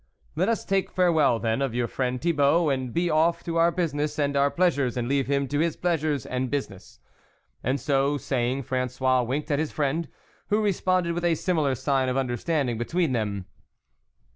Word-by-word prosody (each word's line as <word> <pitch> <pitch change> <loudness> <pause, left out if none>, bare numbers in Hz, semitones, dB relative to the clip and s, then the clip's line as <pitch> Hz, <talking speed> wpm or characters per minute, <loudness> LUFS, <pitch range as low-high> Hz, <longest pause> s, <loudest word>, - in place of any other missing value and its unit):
" - - -36
Let - - +1
us 230 - -1
take 195 -1 0
farewell 160 -9 +3
then 115 +2 -1
of 135 -4 -1
your 120 0 +1
friend 125 +1 -2
Thibault, 155 0 +2
and 130 -2 -2
be 170 +5 0
off 165 +1 +2
to 170 -1 -3
our 165 +1 +5
business 150 -4 -2
and 145 -1 0
our 140 0 +3
pleasures, 140 -8 +1
and 120 -1 -1
leave 135 0 +1
him 140 0 0
to 145 - -1
his 165 0 +1
pleasures 155 -6 -1
and 130 0 -2
business." 125 -10 -5 0.6
And 130 +4 0
so 140 +2 +1
saying, 130 0 -1
Frangois 130 0 0
winked 135 +6 -3
at 145 - +1
his 155 -1 -1
friend, 150 +2 -1 0.4
who 210 - +2
re 210 -2 +2
sponded 185 -2 0
with 175 +1 -3
a 170 -1 +3
similar 155 -5 0
sign 135 +1 0
of 130 - -1
under 125 -2 0
standing 130 -4 -1
between 165 +5 0
them. 105 -5 -2
140 Hz, 195 wpm, -26 LUFS, 130-165 Hz, 0.6 s, our